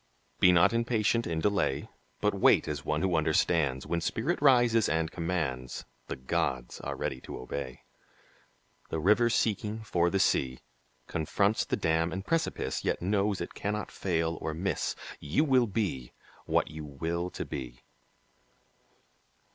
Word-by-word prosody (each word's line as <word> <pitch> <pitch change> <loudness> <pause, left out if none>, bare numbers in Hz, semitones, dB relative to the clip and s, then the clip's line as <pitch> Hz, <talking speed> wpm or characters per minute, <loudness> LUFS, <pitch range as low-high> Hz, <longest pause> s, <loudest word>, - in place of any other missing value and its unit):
Be 90 - +7
not 90 +4 +5
impatient 115 0 +1
in 80 -1 -1
delay, 100 -9 +1 0.3
But - - +2
wait - - +4
as 75 -2 -3
one 75 +2 -1
who 95 -2 +2
understands; 80 -3 +2
When 85 -1 -1
spirit 140 - -1
rises 120 -6 +5
and 80 +1 0
commands, 75 -8 -3 0.2
The - - -3
gods 65 -1 -2
are - - -4
ready 65 -1 -3
to - - -7
obey. 65 0 -6 1.1
The - - -2
river 105 +8 +4
seeking 110 -1 0
for 85 -5 +1
the 95 - 0
sea 65 -8 +1 0.4
Confronts 100 +7 +1
the - - -1
dam 80 +1 +1
and 95 +3 -4
precipice, 165 -1 -1
Yet - - -1
knows 100 +1 +1
it - - -5
cannot 105 +1 -3
fail 85 -3 -1
or 80 - -3
miss; 95 +4 -1 0.2
You 75 - +1
will 130 -5 +4
be 95 - -2 0.3
what - - +1
you 80 0 -7
will 85 +5 -3
to - - -5
be! 60 -3 -7
85 Hz, 145 wpm, -29 LUFS, 75-105 Hz, 1.1 s, Be